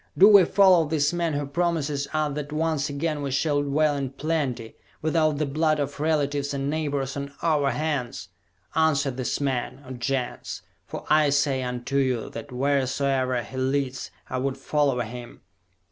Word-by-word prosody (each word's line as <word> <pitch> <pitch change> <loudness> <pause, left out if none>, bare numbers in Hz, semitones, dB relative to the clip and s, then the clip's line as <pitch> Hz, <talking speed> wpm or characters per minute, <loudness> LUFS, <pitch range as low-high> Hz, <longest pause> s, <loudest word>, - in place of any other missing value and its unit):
Do 195 - +9
we 200 -4 +8
follow 185 -5 +5
this 150 0 +1
man 170 -2 0
who 145 0 -1
promises 150 -2 -1
us 155 -2 0
that 145 0 -5
once 155 -1 0
again 145 +1 -2
we 140 - -2
shall 145 +2 +1
dwell 145 +1 +1
in 135 -2 -2
plenty, 135 -6 -2 0.2
without 155 -1 +1
the 155 - 0
blood 155 +2 +1
of 145 0 -3
relatives 145 -2 0
and 140 +1 -1
neighbors 145 -4 -2
on 140 0 -5
our 150 -4 +2
hands? 145 - -3 0.4
Answer 150 -4 +2
this 130 0 -2
man, 135 0 -2
O - - -8
Gens 125 0 -3 0.2
for - - -7
I 155 -1 +5
say 140 -1 +1
unto 125 +2 -3
you 130 -4 0
that 115 +4 -8
wheresoever 130 -1 0
he 130 - -9
leads 130 0 -1 0.2
I 130 - -3
would 135 +1 -2
follow 140 -2 +1
him!" 120 +1 -8
140 Hz, 165 wpm, -25 LUFS, 130-155 Hz, 0.4 s, Do